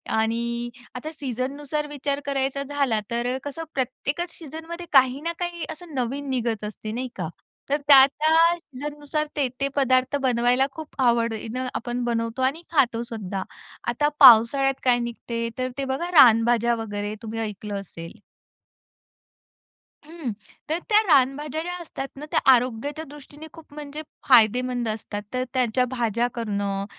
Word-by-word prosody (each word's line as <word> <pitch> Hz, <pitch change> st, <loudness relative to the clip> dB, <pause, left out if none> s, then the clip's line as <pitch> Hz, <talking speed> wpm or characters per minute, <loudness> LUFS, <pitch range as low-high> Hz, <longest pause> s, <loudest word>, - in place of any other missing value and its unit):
आणि 235 Hz, +2 st, -1 dB, 0.3 s
आता 300 Hz, +5 st, -5 dB
सीझननुसार 285 Hz, +2 st, -4 dB
विचार 285 Hz, -1 st, -3 dB
करायचा 275 Hz, 0 st, -1 dB
झाला 280 Hz, -5 st, 0 dB
तर 240 Hz, +2 st, -1 dB
कसं 290 Hz, +3 st, -5 dB
प्रत्येकच 280 Hz, +6 st, -2 dB
सीझनमध्ये 325 Hz, +2 st, -8 dB
काही 260 Hz, 0 st, +5 dB
ना 335 Hz, +2 st, -2 dB
काही 345 Hz, -1 st, -3 dB
असं 320 Hz, 0 st, -9 dB
नवीन 270 Hz, +3 st, -2 dB
निघत 235 Hz, -4 st, -1 dB
असते 215 Hz, +1 st, -6 dB
नाही 250 Hz, +3 st, -3 dB
का. 180 Hz, -4 st, -4 dB, 0.4 s
तर 285 Hz, -, +2 dB
त्या-त्या 285 Hz, +3 st, +6 dB, 0.2 s
सीझननुसार 295 Hz, 0 st, -4 dB
ते-ते 275 Hz, -1 st, -1 dB
पदार्थ 260 Hz, -1 st, +2 dB
बनवायला 250 Hz, 0 st, +3 dB
खूप 315 Hz, +1 st, -10 dB
आवडीनं 235 Hz, 0 st, 0 dB
आपण 240 Hz, +1 st, -3 dB
बनवतो 230 Hz, +1 st, -2 dB
आणि 270 Hz, +6 st, +1 dB
खातोसुद्धा. 230 Hz, -, 0 dB, 0.4 s
आता 295 Hz, -, +1 dB
पावसाळ्यात 270 Hz, +2 st, +7 dB
काय 245 Hz, -1 st, +4 dB
निघते 235 Hz, 0 st, -4 dB
तर 255 Hz, 0 st, -1 dB
ते 275 Hz, -, -2 dB
बघा 270 Hz, +7 st, -2 dB
रानभाज्या 235 Hz, -5 st, +5 dB
वगैरे 205 Hz, -2 st, -4 dB
तुम्ही 225 Hz, 0 st, -5 dB
ऐकलं 210 Hz, -2 st, -4 dB
असेल. 170 Hz, +2 st, -11 dB, 1.9 s
हं 320 Hz, -5 st, -5 dB, 0.4 s
तर 320 Hz, +2 st, 0 dB
त्या 425 Hz, 0 st, +6 dB
रानभाज्या 290 Hz, +1 st, +2 dB
ज्या 355 Hz, +1 st, -4 dB
असतात 275 Hz, -4 st, -6 dB
ना 295 Hz, +2 st, -8 dB
त्या 320 Hz, -, +2 dB
आरोग्याच्या 255 Hz, +5 st, 0 dB
दृष्टीने 295 Hz, +2 st, -12 dB
खूप 325 Hz, -3 st, -15 dB
म्हणजे 295 Hz, 0 st, -7 dB, 0.3 s
फायदेमंद 245 Hz, 0 st, +4 dB
असतात. 215 Hz, -1 st, -4 dB
तर 255 Hz, 0 st, 0 dB
त्यांच्या 250 Hz, -1 st, +2 dB
भाज्या 240 Hz, -1 st, 0 dB
करणं 200 Hz, -4 st, -2 dB
255 Hz, 135 wpm, -24 LUFS, 230-290 Hz, 1.9 s, पावसाळ्यात